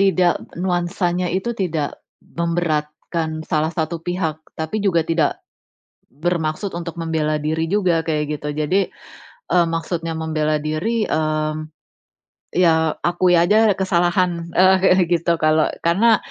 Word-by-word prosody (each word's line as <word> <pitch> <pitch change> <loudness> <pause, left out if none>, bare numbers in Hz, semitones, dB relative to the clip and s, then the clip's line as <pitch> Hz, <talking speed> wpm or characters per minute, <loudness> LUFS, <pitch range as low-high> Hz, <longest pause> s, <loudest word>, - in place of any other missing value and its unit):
tidak 185 -3 +3 0.2
nuansanya 175 0 -1
itu 190 +6 -1
tidak 160 -6 -2 0.2
memberatkan 160 -1 -2
salah 155 0 0
satu 165 +1 -2
pihak, 165 -3 -2 0.2
tapi 160 +7 -3
juga 185 -5 +2
tidak 160 -3 0 0.7
bermaksud 165 +4 -2
untuk 170 -1 -6
membela 155 -2 0
diri 160 +2 -1
juga, 185 -5 +2
kayak 150 -2 0
gitu. 150 - -5
Jadi, 155 +6 +1 0.7
eee, 175 -1 +5
maksudnya 165 0 -3
membela 155 -1 0
diri, 210 +9 -1
mmm, 155 0 -1 0.8
ya 160 -3 +2
akui 175 0 +3
aja 205 +3 +4
kesalahan, 175 -2 +1
eee, 190 +1 +6
kayak 190 -1 +5
gitu. 170 0 +2
Kalau 155 0 +3 0.2
karena 215 +7 +4
170 Hz, 120 wpm, -20 LUFS, 155-180 Hz, 0.8 s, eee